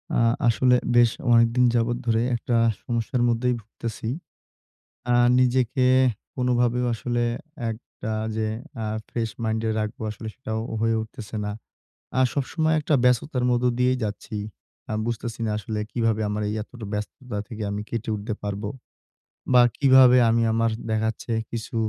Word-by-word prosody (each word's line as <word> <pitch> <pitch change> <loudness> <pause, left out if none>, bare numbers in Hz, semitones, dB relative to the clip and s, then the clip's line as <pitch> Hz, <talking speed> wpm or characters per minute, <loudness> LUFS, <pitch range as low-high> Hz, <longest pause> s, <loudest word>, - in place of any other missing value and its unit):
আ - - +3 0.3
আসলে 125 +2 +4 0.2
বেশ 120 -1 +6 0.2
অনেকদিন 115 +2 +4
যাবৎ 120 +1 +1
ধরে 115 0 +3
একটা 120 +1 -1 0.3
সমস্যার 120 +1 -1
মধ্যেই 120 +2 +1
ভুগতেছি। 110 +1 -6 1.1
আ - - +4 0.2
নিজেকে 125 0 +2 0.5
কোনভাবেও 125 -1 +1
আসলে 120 +1 -1 0.5
একটা 110 0 -7 0.2
যে 110 - 0 0.4
আ - - -2 0.2
ফ্রেশ 115 -2 -2
মাইন্ডে 110 0 0
রাখবো, 105 +1 -4
আসলে 110 +1 -7
সেটাও 110 -4 -4 0.2
হয়ে 115 0 +2
উঠতেছে 110 -1 -8
না। 105 - -2 0.7
আ - - +4
সবসময় 155 +4 0
একটা 150 0 -1
ব্যস্ততার 125 +1 +2
মধ্য 120 0 +1
দিয়েই 125 +1 +2
যাচ্ছি। 105 +1 -4 0.5
আ - - -3
বুঝতেছি 115 0 -4
না 110 - -1
আসলে 110 0 -4
কিভাবে 115 -2 +1
আমার 105 +1 -2
এই - - -2
এতটা 120 -1 -10
ব্যস্ততা 105 +2 -5
থেকে 110 -2 -6
আমি 105 +1 -3
কেটে 115 -1 -3
উঠতে 105 +2 -4
পারবো। 100 0 -3 0.8
বা 125 - +8 0.2
কিভাবে 130 -2 +7
আমি 115 +1 +3
আমার 115 0 +2 0.2
দেখা 110 0 +1
যাচ্ছে 115 +1 -6 0.2
কিছু 115 0 -5
115 Hz, 145 wpm, -24 LUFS, 110-125 Hz, 1.1 s, বা